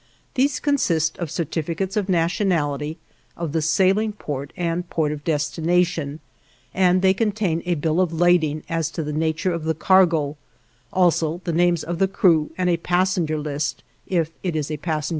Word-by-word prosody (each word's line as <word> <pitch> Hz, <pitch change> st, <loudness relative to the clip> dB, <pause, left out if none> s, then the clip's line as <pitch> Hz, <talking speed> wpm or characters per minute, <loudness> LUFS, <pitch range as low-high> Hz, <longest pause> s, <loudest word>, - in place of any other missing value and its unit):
These 275 Hz, +1 st, +1 dB
consist 170 Hz, -, +1 dB
in 170 Hz, -, -2 dB
certificates 170 Hz, +5 st, -3 dB
of 205 Hz, -2 st, -1 dB
nationality, 165 Hz, -4 st, 0 dB, 0.4 s
of 170 Hz, -3 st, -3 dB
the 160 Hz, +1 st, 0 dB
sailing 195 Hz, +7 st, +2 dB
port, 145 Hz, -8 st, -5 dB
and 175 Hz, 0 st, -2 dB
port 155 Hz, -2 st, 0 dB
of 150 Hz, -1 st, -6 dB
destination, 160 Hz, 0 st, 0 dB, 0.5 s
and 185 Hz, 0 st, +3 dB
they 190 Hz, 0 st, +5 dB
contain 200 Hz, -5 st, 0 dB
a 175 Hz, -, +2 dB
bill 160 Hz, +3 st, +1 dB
of 180 Hz, -3 st, +1 dB
lading 160 Hz, -3 st, +2 dB
as 165 Hz, -2 st, -1 dB
to 165 Hz, -, -1 dB
the 150 Hz, 0 st, -4 dB
nature 160 Hz, +4 st, 0 dB
of 170 Hz, -2 st, -4 dB
the 160 Hz, 0 st, 0 dB
cargo, 165 Hz, -5 st, +3 dB, 0.5 s
also 170 Hz, -2 st, +2 dB
the 170 Hz, -, -2 dB
names 175 Hz, 0 st, +2 dB
of 170 Hz, 0 st, -4 dB
the 195 Hz, -, +4 dB
crew 165 Hz, -5 st, +3 dB
and 185 Hz, -1 st, 0 dB
a 175 Hz, -1 st, +2 dB
passenger 175 Hz, -2 st, 0 dB
list 150 Hz, 0 st, -3 dB, 0.2 s
if 165 Hz, -4 st, 0 dB
it 175 Hz, -4 st, -2 dB
is 155 Hz, -1 st, -2 dB
a 155 Hz, -, -2 dB
passenger 155 Hz, -1 st, -2 dB
steamer. -, -, -2 dB
165 Hz, 175 wpm, -22 LUFS, 155-185 Hz, 0.5 s, they